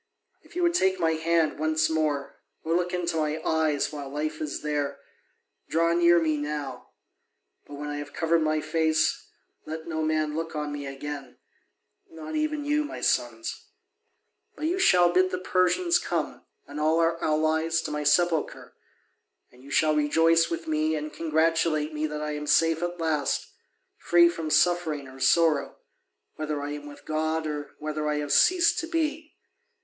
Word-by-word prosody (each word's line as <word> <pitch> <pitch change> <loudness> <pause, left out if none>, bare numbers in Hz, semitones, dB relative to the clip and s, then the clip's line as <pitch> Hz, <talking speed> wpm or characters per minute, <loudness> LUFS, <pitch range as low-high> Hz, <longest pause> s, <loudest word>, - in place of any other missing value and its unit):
If - - -20
you 355 - 0
would 345 0 +3
take 190 - +2
my 165 -2 +2
hand 160 -1 +1
once 155 0 +2
more, 155 -3 -2 0.2
or 165 - -1
look 180 0 0
into 175 -2 -2
my 155 0 -1
eyes 155 -2 +1
while 145 -2 -6
life 155 +2 -4
is 150 -2 -4
there, 145 -2 -2 0.7
draw 165 +1 +2
near 170 0 +5
me 155 -2 0
now; 145 -3 -5 0.8
but 145 - -9
when 145 +1 -6
I 145 - -4
have 145 0 -7
covered 165 +1 +1
my 155 0 +1
face, 160 -1 0 0.4
let 160 +1 -6
no 160 -1 -2
man 155 -1 0
look 165 0 -4
on 150 -1 -3
me 145 -1 -5
again, 140 0 -7 0.7
not 160 -1 -8
even 305 -1 -1
you, 300 +1 +1
my 295 - -7
sons. 115 -2 -1 0.9
But 305 - -5
you 355 +4 0
shall 180 - +5
bid 185 +1 +4
the 185 - -2
Persians 210 - +2
come, - - -3 0.2
and 145 +1 -8
all 155 +2 +2
our 165 0 +1
allies, 160 +1 +1
to - - -4
my 150 0 -2
sepulchre; 160 +2 +1 0.8
and 125 +1 -19
you 140 - -13
shall 155 +2 +2
rejoice 165 +3 +3
with 165 -1 -4
me 155 0 +1
and 155 0 -5
congratulate 160 -1 +1
me 155 +1 -1
that 150 0 -5
I 150 - -3
am 150 0 -5
safe 165 +1 +3
at 175 0 -3
last, 155 -3 -1 0.5
free 170 0 +5
from 165 -2 -4
suffering 155 -3 +2
or 130 0 -13
sorrow, 145 +1 +2 0.6
whether 155 -1 -3
I 145 0 -4
am 145 0 -7
with 145 - -13
God 155 +1 -1
or 150 -1 -5
whether 155 0 -3
I 150 - 0
have 145 -1 -1
ceased 355 -2 +4
to 325 - -4
be. 315 -2 -2
155 Hz, 175 wpm, -26 LUFS, 150-170 Hz, 0.9 s, near